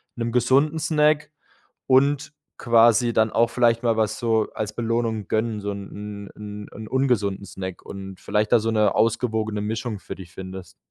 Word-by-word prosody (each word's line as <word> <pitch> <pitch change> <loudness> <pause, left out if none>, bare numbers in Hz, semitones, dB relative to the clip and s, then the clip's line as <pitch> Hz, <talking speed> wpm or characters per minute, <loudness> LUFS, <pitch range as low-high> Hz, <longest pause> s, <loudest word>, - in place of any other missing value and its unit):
'nem 115 -1 -2
gesunden 135 +6 +3
Snack 155 -1 +2 0.6
und 140 +3 +3 0.3
quasi 120 0 +4
dann 110 0 +2
auch 115 0 +3
vielleicht 115 0 +2
mal 115 -1 +2
was 110 -1 0
so 110 -2 +1
als 105 -1 -3
Belohnung 115 -3 -1
gönnen, 110 -1 -1
so 100 0 -3
'n 100 0 -8
'n 105 0 -8
'n 110 0 -8
ungesunden 115 -8 0
Snack 95 -1 -7
und 95 -1 -8
vielleicht 105 0 0
da 120 - +6
so 115 +1 -1
'ne 105 -2 +2
ausgewogene 110 -2 0
Mischung 110 0 -3
für - - -7
dich 90 -2 -12
findest. 95 -1 -9
110 Hz, 165 wpm, -23 LUFS, 105-120 Hz, 0.6 s, da